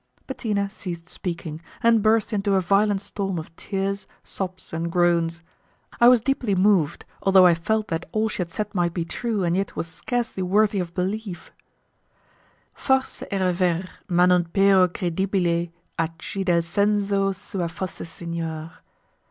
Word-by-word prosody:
Bettina 210 -6 -1
ceased 175 -4 -7
speaking, 165 -3 -5 0.2
and 230 -1 +5
burst 220 +1 +2
into 200 -1 +1
a - - +4
violent 200 +2 +2
storm 195 -2 -3
of 165 0 -7
tears, 195 +1 -3 0.2
sobs, 185 -3 -6
and 165 +1 -2
groans. 170 -1 +2 0.6
I 235 - +7
was 245 -2 +7
deeply 245 -5 0
moved, 185 -5 +2 0.2
although 190 -1 +6
I 175 - +7
felt 215 +6 -1
that 165 0 -3
all 220 +1 +1
she 215 - -5
had 175 -2 -1
said 210 +4 -4
might 175 -3 0
be 170 -2 -1
true, 220 +2 -2
and 170 0 +1
yet 195 +1 -2
was - - -2
scarcely 230 +5 -3
worthy 205 +2 +2
of 175 -2 -4
belief: 190 0 -3 1.2
'Forse 265 -1 0
era 190 -2 +1
ver, 175 -1 +1 0.3
ma 175 0 +4
non 180 -1 +4
pero 195 +1 +4
credibile 175 -1 0 0.3
A 165 - +2
chi 195 - -5
del 175 -3 +2
senso 200 +2 +1
suo 190 -2 -4
fosse 180 +2 -6
signor. 165 -1 -5
190 Hz, 155 wpm, -24 LUFS, 170-205 Hz, 1.2 s, I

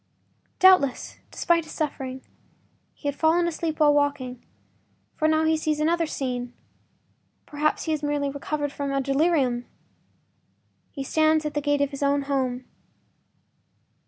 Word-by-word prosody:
Doubtless, 370 -9 +4
despite 340 -1 +1
his 315 - -10
suffering, 265 -4 -4 0.7
he 290 - -7
had 285 - -1
fallen 330 +3 +2
asleep 325 -1 -3
while 295 -1 +5
walking, 285 -4 -1 0.7
for 310 - +1
now 315 0 +2
he 320 0 +3
sees 310 -1 -1
another 330 +2 +1
scene—perhaps 265 +3 -5
he 320 - -2
has 305 -2 -1
merely 290 -1 -1
recovered 290 +1 -3
from 280 -1 -4
a 275 - 0
delirium. 275 -3 +1 1.2
He 275 - -6
stands 310 +2 +2
at 300 - -3
the 295 - -1
gate 290 0 +1
of 285 0 +1
his 275 - -7
own 280 0 +2
home. 260 -3 -2
290 Hz, 135 wpm, -25 LUFS, 275-315 Hz, 1.2 s, while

